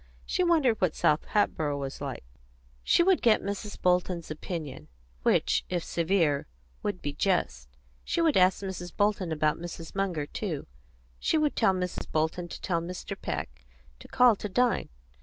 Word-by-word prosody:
She 365 - 0
wondered 310 -10 +3
what 180 -4 +2
South 150 0 +2
Hatboro' 155 -8 0
was 135 -1 -5
like; - - -5 0.6
she 345 - +4
would 375 0 +3
get 225 -3 +5
Mrs. 200 +1 -5
Bolton's 180 -2 +1
opinion, 155 - -6 0.3
which, - - +2
if 175 -2 -1
severe, 165 -4 +1 0.3
would 205 -3 -3
be 145 - -2
just. 65 - 0 0.3
She - - -1
would 325 -3 +3
ask 185 +1 +4
Mrs. 180 -2 -5
Bolton 205 -4 +1
about 155 0 +1
Mrs. 165 -1 -7
Munger, 185 -7 -1
too. 165 -1 -4 0.5
She - - +1
would 305 -1 +1
tell 195 -5 +3
Mrs. 180 -1 -4
Bolton 160 +3 0
to - - -8
tell 170 -3 -1
Mr. 175 +2 -6
Peck - - -5 0.4
to - - -12
call 245 -3 +5
to 210 - -5
dine. 245 +5 +1
180 Hz, 160 wpm, -28 LUFS, 155-205 Hz, 0.6 s, get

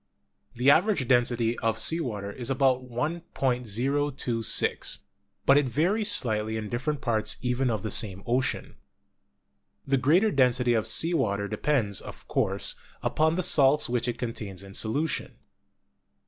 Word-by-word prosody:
The 125 +4 +4
average 170 - +2
density 120 -2 +1
of 115 -2 0
sea 165 +8 +1
water 105 -9 -4
is 120 +4 -4
about 130 -1 +1
1.026, 125 -3 -1 0.5
but 140 +1 +6
it 145 - -1
varies 195 - +1
slightly 110 - +2
in 105 -1 -5
different 135 +4 -3
parts 110 -3 0
even 125 +1 0
of 110 -4 -2
the 110 - -3
same 100 -2 0
ocean. 125 +2 -2 1.1
The 135 0 +1
greater 170 +12 +3
density 125 -4 +2
of 110 -2 0
sea 165 +2 +1
water 100 -9 0
depends, 110 -5 -1
of - - -12
course, - - 0 0.3
upon 160 +1 +1
the 185 - -1
salts 145 -3 +4
which 125 0 -1
it 120 - -2
contains 105 -6 -6
in 95 0 -12
solution. 140 +11 -2
125 Hz, 140 wpm, -27 LUFS, 115-145 Hz, 1.1 s, but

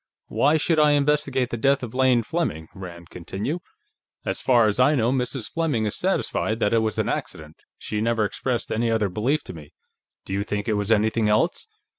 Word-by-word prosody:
"Why 150 +3 +3
should 160 0 +1
I 150 -1 +5
investigate 140 -3 +1
the 120 - -2
death 135 +3 +2
of 120 -1 -6
Lane 130 -2 +3
Fleming?" 110 - -3
Rand 85 -4 -10
continued. 100 - -4 0.6
"As - - -2
far 120 -3 +4
as 105 +2 0
I 145 +4 +5
know, 120 -2 +2
Mrs. 125 -2 -2
Fleming 150 -10 0
is 105 - -2
satisfied 175 - -1
that 105 - +1
it 115 - +4
was 110 -1 -1
an - - 0
accident. 75 0 -5 0.2
She 105 - -4
never 115 -1 +1
expressed 120 +3 -2
any 115 +1 0
other 110 -3 +1
belief 125 - 0
to - - -8
me. 75 -3 -12 0.5
Do - - -5
you 100 - 0
think 105 +1 -3
it 110 - +1
was 105 +1 -1
anything 110 0 +2
else?" 165 - +1
115 Hz, 200 wpm, -24 LUFS, 105-140 Hz, 0.6 s, I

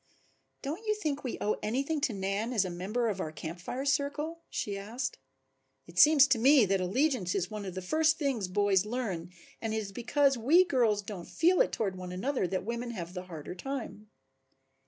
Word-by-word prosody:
"Don't 310 +10 -4
you 425 - +2
think 300 -9 -3
we 255 - -3
owe 210 - 0
anything 275 +7 -1
to 275 - +1
Nan 200 +4 -2
as 205 -5 +2
a 180 - -4
member 205 +7 -1
of 200 -3 -2
our 155 - -3
Camp 160 +3 -7
Fire 250 +10 -4
circle?" 290 +4 -1
she 205 - -3
asked. 225 +6 -4 0.7
"It - - -5
seems 300 -2 +8
to 255 -4 +3
me 265 0 +6
that 195 -1 +1
allegiance 210 - +1
is 185 -1 -1
one 210 -1 -5
of 190 -1 -6
the 185 - -4
first 315 - +2
things 265 - -1
boys 195 0 +2
learn 210 -7 -3 0.3
and 220 -1 -2
it - - 0
is 205 -3 -4
because 270 +4 +2
we 325 +11 +5
girls 225 - +2
don't 195 -4 -8
feel 355 +5 +3
it - - +2
toward 195 -4 -2
one 180 -1 -6
another 225 +3 -1
that 185 +1 -3
women 235 +2 -3
have 180 -6 -6
the 180 -1 -6
harder 165 -2 -7
time." 215 -1 -6
220 Hz, 200 wpm, -30 LUFS, 190-275 Hz, 0.7 s, seems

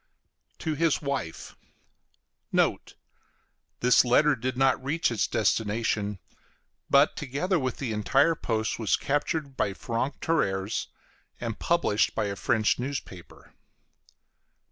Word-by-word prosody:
B. - - -46
TO 160 - -2
HIS 165 0 +1
WIFE 140 - -4 1.0
Note. - - 0 0.9
This 125 0 +5
letter 140 +4 +4
did 130 +1 -3
not 135 -1 +2
reach 145 +1 0
its 115 - 0
destination, 105 -1 0 0.7
but, 140 +2 +5
together 150 +6 -1
with 130 -2 -2
the 125 -5 -3
entire 135 +9 +3
post, 110 -8 -2
was 110 -3 +2
captured 145 0 -2
by 100 -5 -1
franc 120 +6 -3
tireurs 100 -9 -1 0.5
and 115 -2 -4
published 170 -11 +1
by - - 0
a 100 -1 -3
French 110 +3 +1
newspaper. 125 -9 -7
125 Hz, 120 wpm, -27 LUFS, 110-145 Hz, 1.0 s, This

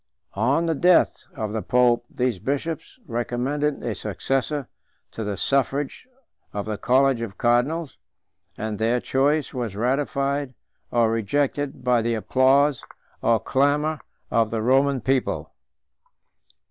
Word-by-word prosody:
On 130 +11 +1
the 165 - +1
death 175 +3 +3
of 110 -5 -3
the 110 - -1
pope, 120 0 +3
these 125 -6 -1
bishops 145 - -3
recommended 130 +5 -2
a 115 - -1
successor 135 +7 -2 0.4
to 110 - -5
the 100 -2 -3
suffrage 140 - -1 0.5
of 100 -1 -3
the 105 -2 -4
college 130 +1 +3
of 100 -4 -6
cardinals, 130 +6 +1 0.6
126 110 - -4
and 105 -1 -4
their 115 +2 +2
choice 140 +4 +1
was 120 -6 -3
ratified 140 +3 -1 0.3
or 115 -2 +2
rejected 135 +6 -1
by 125 -2 +3
the 115 +1 0
applause 135 +4 +3 0.4
or 115 -1 +3
clamor 145 +6 +1 0.3
of 115 -2 +2
the 110 -1 -2
Roman 135 +2 +3
people. 130 +1 -1
130 Hz, 130 wpm, -24 LUFS, 115-140 Hz, 0.6 s, death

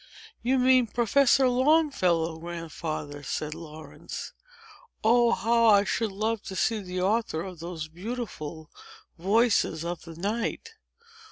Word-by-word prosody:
"You 255 +3 +2
mean 255 -1 +4
Professor 255 +4 +3
Longfellow, 245 - +2
Grandfather," 160 -3 -5
said 150 +2 -3
Laurence. 160 -1 -9 0.7
"Oh, 235 +2 +5
how 230 +1 +3
I 200 -2 +6
should 215 +1 -1
love 215 +2 -1
to 190 - -6
see 220 +4 +1
the 180 -2 -4
author 195 -4 0
of 185 -4 -8
those 165 -2 -6
beautiful 170 -4 -6 0.5
VOICES 200 -4 +2
OF 175 -1 -4
THE 165 -1 -11
NIGHT!" 220 - -3
195 Hz, 120 wpm, -27 LUFS, 165-235 Hz, 0.7 s, I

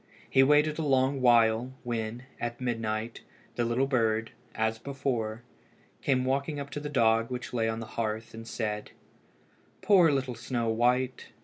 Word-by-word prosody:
He 135 - +4
waited 150 +3 +4
a - - 0
long 135 -1 +2
while, 120 +1 +4
when, 120 0 -3 0.2
at 120 0 -4
midnight, 115 -2 -3 0.3
the 120 - -1
little 120 +3 +1
bird, 115 -4 +1 0.2
as 110 0 0
before, 120 -5 -3 0.6
came 130 -2 +1
walking 140 +3 -1
up 140 0 -6
to 145 - -4
the 150 0 -5
dog 115 -4 +3
which 125 -1 -5
lay 115 -2 +1
on 110 0 -3
the 115 - -5
hearth, 110 -1 -4
and 115 0 -9
said 105 -3 -4 0.9
"Poor 180 -6 +6
little 130 -2 -1
Snow 120 0 -2
white! 125 +3 +1
120 Hz, 155 wpm, -29 LUFS, 115-135 Hz, 0.9 s, Poor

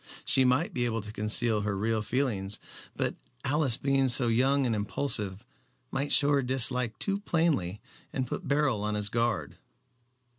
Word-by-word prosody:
She 130 - +4
might 150 +11 +1
be 120 -4 0
able 115 -3 -2
to 105 - -8
conceal 105 +1 +1
her 100 -1 -2
real 110 +2 0
feelings, 105 -5 -1 0.4
but - - -1 0.3
Alice 140 -3 +3
being 135 -1 +1
so 120 -1 +6
young 135 +4 +2
and 120 - 0
impulsive 105 0 -3 0.5
might 140 +2 -2
show 145 0 +4
her 140 -1 +3
dislike 125 -2 +1
too 200 0 0
plainly 155 - 0 0.3
and 130 - -2
put - - -6
Beryl 140 -6 +1
on 105 0 -1
his 105 0 -2
guard. 115 -2 -1
120 Hz, 160 wpm, -28 LUFS, 105-135 Hz, 0.5 s, so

